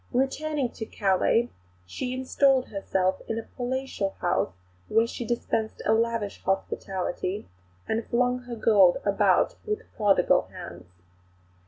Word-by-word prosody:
Returning 270 +1 0
to 220 - -6
Calais 205 +4 +2 0.3
she 250 - -4
installed 260 0 +2
herself 190 -2 0
in 225 - -2
a 225 - -3
palatial 250 -6 -3
house 175 - +1 0.4
where 225 - +3
she 240 - -5
dispensed 225 -1 -2
a 220 - +4
lavish 230 -2 0
hospitality, 190 0 -2 0.4
and 225 +1 -1
flung 250 +1 +1
her 240 -1 -5
gold 205 -5 +5
about 200 -1 +3
with 425 +1 -3
prodigal 205 -4 +3
hands. - - -10
230 Hz, 125 wpm, -27 LUFS, 195-250 Hz, 0.4 s, gold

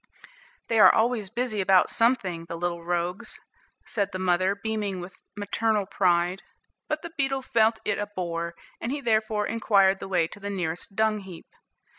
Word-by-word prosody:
"They 225 -1 +2
are - - +9
always 220 -3 +1
busy 230 -2 -1
about 190 -1 +4
something, 195 -8 +1
the 170 - -6
little 170 0 -3
rogues," 175 +5 -2 0.5
said 200 -3 -1
the 185 - -4
mother, 185 +1 +1
beaming 205 -2 -3
with 180 +1 -8 0.2
maternal 210 0 0
pride; 180 0 +1 0.5
but 305 +1 -2
the 335 -1 -8
beetle 270 -2 0
felt 225 -2 +3
it 210 - 0
a 205 - -2
bore, 170 -3 -4 0.3
and 235 - -2
he 290 - -2
therefore 215 -4 +1
inquired 200 -4 +3
the - - -6
way 180 -3 +2
to - - -10
the 200 0 -5
nearest 180 -1 -3
dung 220 0 +2
heap. 190 -4 -11
200 Hz, 170 wpm, -26 LUFS, 180-220 Hz, 0.5 s, are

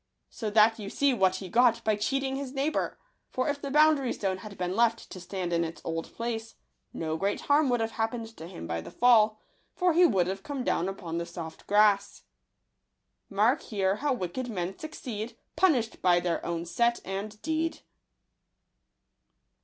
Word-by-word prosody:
So 220 - -4
that 220 +2 +5
you 200 -2 -5
see 280 +3 +2
what 190 -5 +3
he 185 0 -6
got 235 +3 +3
by 215 -1 +2
cheating 270 +5 -1
his 270 -1 -5
neighbour; 280 +3 -1 0.3
for 255 - -1
if 285 0 -2
the 280 - -4
boundary 300 -3 +4
stone 190 -2 -2
had 200 +1 -10
been 180 +1 -2
left 230 0 +1
to 185 - -7
stand 180 -1 -4
in 170 0 +2
its 165 0 -5
old 165 0 -3
place, 230 -1 -4 0.4
no 160 -1 -3
great 200 +4 -1
harm 290 -1 +3
would 245 -2 +1
have 225 0 -1
happened 225 0 -3
to 160 - -8
him 85 - -8
by 85 0 -3
the 85 - -9
fall; 220 - +4 0.4
for 360 -2 +2
he 350 +3 +5
would 185 - +2
have 190 +2 -3
come 280 0 -4
down 185 -6 0
upon 170 -4 -4
the 170 - -3
soft 165 -2 -8
grass. 205 -1 +3 1.1
Mark 215 +8 +2
here 195 -2 0
how 290 +3 0
wicked 245 +2 -3
men 185 -3 -3
succeed, 240 -7 -6 0.2
Punish'd 260 -12 +2
by 175 -1 +4
their 175 -1 -1
own 170 0 -3
act 235 0 +3
and 205 +3 -5
deed. 320 +1 -1
215 Hz, 180 wpm, -28 LUFS, 185-255 Hz, 1.1 s, that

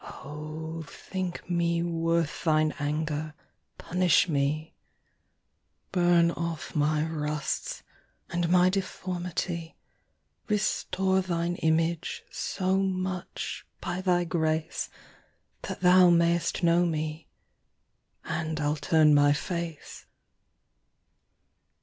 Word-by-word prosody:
O 155 +3 -7
thinke 185 +2 -5
mee 170 -1 +1
worth 165 -2 0
thine 155 -2 +3
anger, 150 +1 -2 0.4
punish 180 -1 +3
mee. 150 +1 -1 1.2
Burne 175 -2 +4
off 170 -3 -4
my 150 0 +2
rusts, 150 -2 -3 0.5
and 175 -1 0
my 180 0 +5
deformity, 180 -3 -3 0.7
Restore 190 -2 +1
thine 175 -1 -1
Image, 165 +1 0
so 190 0 -1
much, 185 -1 -3 0.2
by 180 - -3
thy 180 -2 +2
grace, 160 -1 -1 0.7
That - - -6
thou 180 0 +7
may'st 170 +1 +2
know 170 +1 +4
mee, 155 -1 -2 1.0
and 160 -1 -2
I'll 150 +1 0
turne 150 +1 +4
my 145 0 +5
face. 170 0 -5
170 Hz, 90 wpm, -28 LUFS, 155-175 Hz, 1.2 s, thou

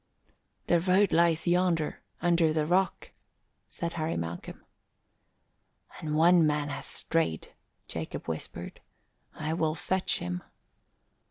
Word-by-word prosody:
"The 175 - +3
road 190 +3 +3
lies 165 -1 +3
yonder 175 -3 +1 0.2
under 170 -2 +4
the 155 -1 +1
rock," 185 +4 +1 0.6
said 170 -1 -4
Harry 160 -1 -2
Malcolm. 85 +1 -6 1.3
"And 150 -1 -2
one 170 0 +6
man 150 -1 0
has 140 - -5
strayed," 165 - -1 0.3
Jacob 80 -1 -5
whispered. 80 -1 -5 0.5
"I 155 +1 -2
will 160 -1 0
fetch 185 +2 0
him." 90 0 -4
165 Hz, 110 wpm, -29 LUFS, 150-175 Hz, 1.3 s, one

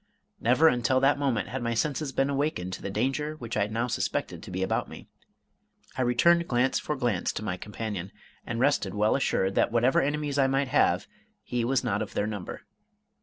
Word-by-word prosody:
Never 125 +8 +4
until 125 -1 +3
that 140 +1 +3
moment 130 -7 0
had 130 +2 -4
my 115 0 -1
senses 145 +4 -1
been 135 +1 +1
awakened 135 -11 -1
to - - -6
the - - -4
danger 135 +9 -1
which 120 -6 -6
I 100 -1 +1
now 115 +3 -1
suspected 125 - -2
to - - -10
be 95 +1 -2
about 95 - -1
me. - - -11 0.9
I - - -1
returned 170 +8 +3
glance 125 +1 +2
for 150 - -3
glance 120 -9 0
to - - -5
my 95 -4 -2
companion, 100 -1 -5 0.3
and 120 0 -4
rested 120 -8 +1
well 105 +1 +2
assured 95 -8 +1
that - - +2
whatever 120 +3 +3
enemies 145 0 -1
I 135 - +4
might 135 0 0
have, 145 - +3 0.4
he 120 -1 -2
was 130 +2 +1
not - - 0
of - - -5
their 100 - +1
number. 105 -4 -5
125 Hz, 200 wpm, -27 LUFS, 110-140 Hz, 0.9 s, Never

